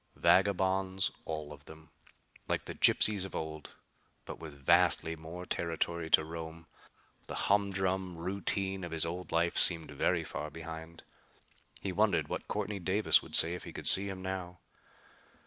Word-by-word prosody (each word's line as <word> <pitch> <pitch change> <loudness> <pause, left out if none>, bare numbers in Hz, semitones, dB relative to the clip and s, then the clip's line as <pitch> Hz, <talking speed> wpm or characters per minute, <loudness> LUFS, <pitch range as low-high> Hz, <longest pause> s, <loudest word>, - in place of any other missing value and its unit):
Vagabonds, 95 0 +2
all 75 -2 -5
of 75 0 -15
them! 80 0 -14 0.6
Like - - -2
the - - -6
gypsies 105 -3 +5
of 95 - -6
old, 80 -1 -6 0.5
but - - -8
with 80 -3 -9
vastly 85 +3 +3
more 80 +3 -9
territory 85 -1 -2
to 80 - +5
roam. 80 0 -8 0.6
The - - -6
humdrum 95 -3 0
routine 95 +2 -2
of 85 -1 -6
his 80 -1 +3
old 85 +1 -6
life 85 +1 +1
seemed 80 -4 +3
very 70 - 0
far 75 - -6
behind. 80 +1 -9 0.8
He - - -3
wondered - - +1
what - - -5
Courtney 105 -1 -3
Davis 95 +4 +3
would - - -3
say 85 +2 +5
if 90 - -7
he - - -8
could - - -4
see 100 +1 +4
him 95 -1 -7
now. 95 -1 -5
85 Hz, 155 wpm, -31 LUFS, 80-95 Hz, 0.8 s, gypsies